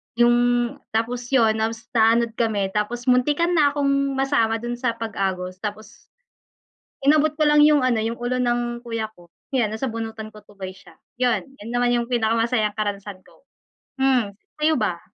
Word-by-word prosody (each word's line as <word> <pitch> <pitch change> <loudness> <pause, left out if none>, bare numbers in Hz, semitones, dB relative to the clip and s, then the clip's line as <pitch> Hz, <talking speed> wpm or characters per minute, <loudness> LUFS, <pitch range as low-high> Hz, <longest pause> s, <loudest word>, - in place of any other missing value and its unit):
'Yung 240 0 +5 0.6
tapos 240 +2 -1
'yun 230 -4 +5
na 220 +1 +1
naanod 230 0 +1
kami 205 -4 0
tapos 215 +4 -2
muntikan 295 +7 +2
na 300 -4 +4
akong 275 -1 +1
masama 265 -5 +1
do'n 240 0 -4
sa 235 -3 -1
pag-agos 190 -5 -3
tapos 210 +1 -7 1.1
Inabot 305 +1 +4
ko 305 - +1
lang 295 0 +4
'yung 295 -3 +4
ano, 250 -3 +2
'yung 225 +2 -2
ulo 245 +1 -2
ng 240 -1 -1
kuya 225 -2 -3
ko,' 175 -5 -19 0.2
yan 240 -6 +1
nasabunutan 225 -2 -5
ko 215 - -13
tuloy 195 -2 -8
siya. 190 - -17 0.2
'Yun, 245 -5 +2 0.2
'yun 210 - -9
naman 245 0 +2
'yung 240 -1 0
pinakamasayang 225 -2 +1
karanasan 205 -2 -4
ko. - - -23 0.6
Hmm, 255 -6 +2 0.3
sa'yo 310 +1 +3
ba? - - -1
235 Hz, 160 wpm, -23 LUFS, 220-255 Hz, 1.1 s, Yung